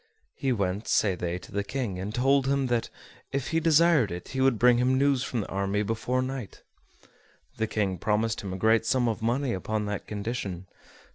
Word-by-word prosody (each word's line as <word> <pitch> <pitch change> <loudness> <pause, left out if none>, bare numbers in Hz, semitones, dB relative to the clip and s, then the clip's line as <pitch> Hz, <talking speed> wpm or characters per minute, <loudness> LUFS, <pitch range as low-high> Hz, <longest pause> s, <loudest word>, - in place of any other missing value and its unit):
He 135 -2 -1
went, 100 -2 -1
say 100 -3 +3
they, 90 -1 -3
to 90 - -13
the 100 0 -1
King, 105 -4 -3
and 95 +3 -4
told 135 +3 +2
him 140 0 +1
that, 115 - 0 0.4
if 140 0 -2
he 165 - +1
desired 165 - +4
it, 90 0 -6
he 130 - -2
would 130 -3 +3
bring 120 +1 +5
him 130 +1 +2
news 140 -1 +3
from 120 - -2
the - - -6
army 100 +1 -1
before 115 +4 -1
night. 130 -5 -6 0.9
The 110 - 0
King 100 -5 -1
promised 110 +3 0
him 100 - -5
a 95 - -4
great 110 +3 +3
sum 125 -1 +2
of 110 -2 -2
money 120 +3 0
upon 105 +3 -2
that 105 -1 -4
condition. 100 -4 -4
115 Hz, 200 wpm, -27 LUFS, 100-130 Hz, 0.9 s, bring